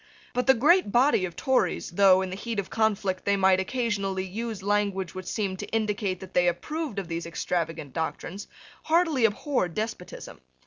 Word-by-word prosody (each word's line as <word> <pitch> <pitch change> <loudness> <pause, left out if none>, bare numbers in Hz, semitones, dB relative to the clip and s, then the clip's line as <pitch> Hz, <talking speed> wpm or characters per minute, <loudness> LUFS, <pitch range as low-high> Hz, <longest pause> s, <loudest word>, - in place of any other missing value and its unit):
But 250 +1 -1
the 265 - +7
great 300 - +4
body 245 -4 +4
of 175 -2 -7
Tories, 265 -1 0
though, 190 0 +5
in 185 - -5
the - - -4
heat 230 +3 -5
of 200 - -3
conflict, 205 -4 0
they 200 0 +2
might 190 -1 +4
occasionally 200 -3 -1
use 215 +1 -5
language 200 -3 0
which 185 -1 -7
seemed 195 -4 -2
to - - -5
indicate 210 -4 -1
that 190 - -10
they 180 0 +3
approved 300 - -2
of 195 -3 -3
these 170 0 -4
extravagant 165 -4 -3
doctrines, 175 +5 -4 0.4
heartily 320 -7 +3
abhorred 210 - 0
despotism. 215 -4 -5
200 Hz, 175 wpm, -27 LUFS, 185-230 Hz, 0.4 s, the